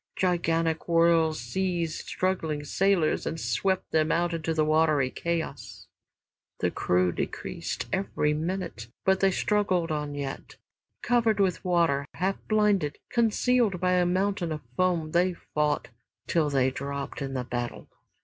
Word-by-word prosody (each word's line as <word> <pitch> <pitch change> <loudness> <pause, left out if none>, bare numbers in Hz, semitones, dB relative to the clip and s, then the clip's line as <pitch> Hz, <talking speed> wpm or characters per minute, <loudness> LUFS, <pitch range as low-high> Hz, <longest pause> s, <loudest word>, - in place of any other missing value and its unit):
Gigantic 165 -3 +1
whirls 165 -2 +3
seized 170 +5 -2
struggling 160 -5 -1
sailors 185 +1 +1
and 165 - -3
swept 190 +2 -1
them 155 0 +2
out 170 0 +1
into 165 0 -2
watery 155 -4 +3
chaos. 130 - -4 0.7
The - - 0
crew 90 0 +1
decreased 85 0 -4
every 190 -6 0
minute, 160 - -3 0.2
but 190 0 +3
they 195 - +4
struggled 185 -3 +1
on 150 -1 -3
yet. 140 -1 -6 0.5
Covered 230 -3 +2
with 190 -3 +1
water, 165 -6 +2
half 190 +3 0
blinded, 205 -9 +2
concealed 235 -3 +2
by 180 +1 +1
a 180 -1 +3
mountain 185 -1 0
of 155 -1 -3
foam, 170 -3 +1
they 180 +2 +2
fought 150 -4 -1 0.4
till 160 -3 +1
they 130 -2 +2
dropped 140 +1 -5
in 135 -1 -3
the 130 - -1
battle. 120 -1 -4
165 Hz, 135 wpm, -27 LUFS, 145-185 Hz, 0.7 s, they